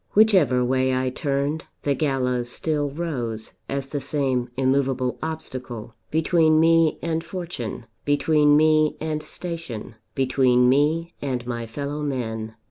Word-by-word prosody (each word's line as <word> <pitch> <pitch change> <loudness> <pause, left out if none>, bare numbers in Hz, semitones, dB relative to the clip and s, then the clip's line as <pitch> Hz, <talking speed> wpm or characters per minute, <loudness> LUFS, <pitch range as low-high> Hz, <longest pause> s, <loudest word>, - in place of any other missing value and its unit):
Whichever 180 - +5
way 130 +1 +2
I 130 0 0
turned, 140 +3 -1 0.2
the 140 - +2
gallows 125 -4 0
still 150 +2 -1
rose 130 -8 -4 0.2
as 135 0 -3
the 145 - -2
same 135 -3 -1
immovable 130 -1 +1
obstacle 130 -8 -5 0.2
between 160 0 +3
me 165 -1 +4
and 165 -1 -1
fortune, 170 - -6 0.2
between 145 0 +4
me 155 0 +4
and 155 -1 -2
station, 155 -9 -6 0.2
between 130 -2 +3
me 150 +6 +2
and 125 -4 -2
my 120 -1 -4
fellowmen. 125 -5 -4
140 Hz, 125 wpm, -24 LUFS, 125-155 Hz, 0.2 s, Whichever